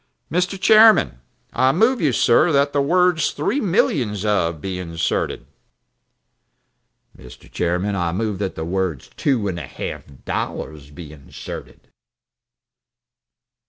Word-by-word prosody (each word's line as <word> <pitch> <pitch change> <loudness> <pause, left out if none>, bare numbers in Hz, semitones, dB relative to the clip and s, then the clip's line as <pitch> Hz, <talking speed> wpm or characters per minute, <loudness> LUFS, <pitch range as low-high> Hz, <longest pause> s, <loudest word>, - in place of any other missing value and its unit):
Buckstone 180 +3 0
"Mr. - - -22
Chairman, 215 - +5 0.3
I 130 +1 +3
move 225 - +2
you, 150 -4 +2
sir, 120 +8 +3
that 140 +1 +2
the 145 - +2
words 175 +1 +2
'three 150 - -1
millions 125 - 0
of' 85 -6 0
be 95 +3 -5
inserted." 85 -2 -2 1.7
Mr. - - -18
Hadley - - -13 0.2
"Mr. - - -23
Chairman, 90 +4 -1
I 85 -3 -1
move 105 +1 -3
that 95 -2 -3
the 80 - -5
words 90 -5 -3
two 125 -8 0
and 90 -3 -3
a 70 - -7
half - - -7 0.2
dollars 75 -3 -5
be 75 +1 -11
inserted." 70 -3 -10
105 Hz, 135 wpm, -21 LUFS, -, 1.7 s, Chairman